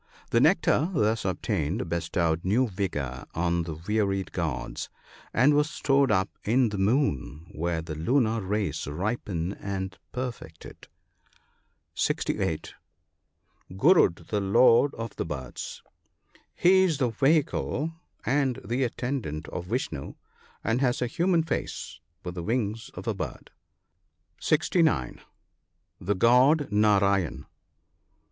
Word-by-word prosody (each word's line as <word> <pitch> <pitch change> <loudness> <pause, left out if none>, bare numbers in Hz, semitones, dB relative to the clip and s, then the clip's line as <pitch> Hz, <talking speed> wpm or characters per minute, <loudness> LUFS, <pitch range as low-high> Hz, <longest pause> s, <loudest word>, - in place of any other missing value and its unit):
The 115 - +4
nectar 160 +1 +3
thus 110 -3 +1
obtained 90 - -1
bestowed 85 0 0
new 115 +7 +2
vigour 75 - -3
on 85 0 +1
the 80 -2 -5
wearied 100 -3 0
gods, - - -3 0.4
and 135 +6 +4
was 150 +1 +2
stored 140 -2 +2
up 95 -1 0
in 120 +2 +3
the 105 -2 -4
moon, 95 - 0
where 80 0 -2
the 80 -1 -6
lunar 115 - +1
rays 100 -3 -2
ripen 90 +1 -2
and 95 -2 -5 0.2
perfect 125 -10 -6
it. - - -12 1.1
(68.) - - -1 1.0
Gur&dy 105 - +4
the 105 +5 -2
lord 115 +7 +5
of 115 -1 -6
the - - -1
birds. 65 -6 -6 0.4
— - - -50 0.3
He 190 +2 +5
is 175 -6 +2
the 130 -3 +1
vehicle 150 +4 +1 0.3
and 135 -1 +1
the 120 +6 0
attendant 120 - -3
of 90 0 -6
Vishnoo, 90 - -3 0.5
and 115 +3 0
has 125 -2 +1
a - - +1
human 170 +5 +1
face 85 - -4 0.2
with 90 - -5
the 90 - -5
wings 110 +2 -2
of - - -8
a - - +1
bird. - - -6 0.9
(69.) 155 - +1 0.8
The 100 +3 -1
god 130 - +4
Narayen. 100 -8 +2
105 Hz, 125 wpm, -27 LUFS, 85-130 Hz, 1.1 s, lord